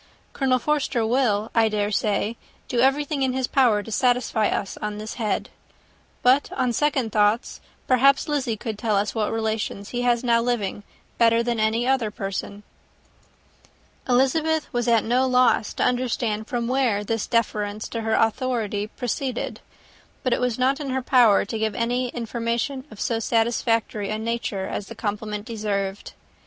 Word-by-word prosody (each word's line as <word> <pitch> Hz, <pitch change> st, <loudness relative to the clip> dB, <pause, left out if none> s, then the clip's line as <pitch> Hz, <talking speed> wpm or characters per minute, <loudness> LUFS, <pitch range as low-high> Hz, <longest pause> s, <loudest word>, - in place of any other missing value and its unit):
Colonel 260 Hz, -2 st, +2 dB
Forster 260 Hz, -4 st, 0 dB
will, 220 Hz, -3 st, +1 dB
I 225 Hz, -1 st, +4 dB
dare 210 Hz, -1 st, -1 dB
say, 210 Hz, +2 st, 0 dB, 0.3 s
do 245 Hz, -, -1 dB
everything 275 Hz, +3 st, +2 dB
in 260 Hz, -1 st, +1 dB
his 260 Hz, 0 st, 0 dB
power 240 Hz, -6 st, +3 dB
to 225 Hz, -, -9 dB
satisfy 245 Hz, -2 st, +2 dB
us 195 Hz, -, -2 dB
on 210 Hz, 0 st, -4 dB
this 215 Hz, +1 st, -6 dB
head. 210 Hz, -3 st, -1 dB, 0.7 s
But, 260 Hz, +3 st, +4 dB
on 250 Hz, -2 st, 0 dB
second 265 Hz, -3 st, +1 dB
thoughts, 210 Hz, +2 st, +1 dB, 0.2 s
perhaps 270 Hz, +2 st, +4 dB
Lizzy 270 Hz, -7 st, -1 dB
could 215 Hz, 0 st, -5 dB
tell 215 Hz, -2 st, 0 dB
us 200 Hz, +1 st, 0 dB
what 215 Hz, -2 st, -1 dB
relations 220 Hz, -2 st, -2 dB
he 245 Hz, -, -2 dB
has 240 Hz, -1 st, +2 dB
now 235 Hz, -1 st, +3 dB
living 230 Hz, -5 st, -1 dB, 0.4 s
better 230 Hz, 0 st, +4 dB
than 235 Hz, -1 st, -1 dB
any 220 Hz, +2 st, +1 dB
other 260 Hz, -5 st, +2 dB
person." 200 Hz, 0 st, -5 dB, 1.5 s
Elizabeth 310 Hz, +5 st, +2 dB
was 240 Hz, -1 st, -1 dB
at 230 Hz, -2 st, +4 dB
no 250 Hz, +3 st, +2 dB
loss 250 Hz, -4 st, +3 dB
to -, -, 0 dB
understand 235 Hz, -3 st, 0 dB
from 235 Hz, -1 st, -2 dB
whence 245 Hz, -6 st, +1 dB
this 225 Hz, 0 st, -2 dB
deference 215 Hz, -2 st, -1 dB
for 230 Hz, -, -4 dB
her 220 Hz, 0 st, 0 dB
authority 225 Hz, -3 st, 0 dB
proceeded; 250 Hz, +2 st, -3 dB, 0.6 s
but 255 Hz, -3 st, +2 dB
it -, -, -1 dB
was 250 Hz, -2 st, 0 dB
not 265 Hz, +3 st, +2 dB
in 285 Hz, -2 st, -4 dB
her 260 Hz, 0 st, -1 dB
power 245 Hz, -6 st, +5 dB
to 220 Hz, +2 st, -4 dB
give 220 Hz, -2 st, -1 dB
any 245 Hz, +2 st, 0 dB
information 235 Hz, +3 st, -3 dB
of 215 Hz, -, -13 dB
so 230 Hz, -1 st, 0 dB
satisfactory 225 Hz, -2 st, 0 dB
a 215 Hz, -, -1 dB
nature 220 Hz, -3 st, -2 dB
as 195 Hz, -, -4 dB
the -, -, -9 dB
compliment 210 Hz, 0 st, -4 dB
deserved. 205 Hz, -3 st, -3 dB
230 Hz, 165 wpm, -24 LUFS, 215-255 Hz, 1.5 s, power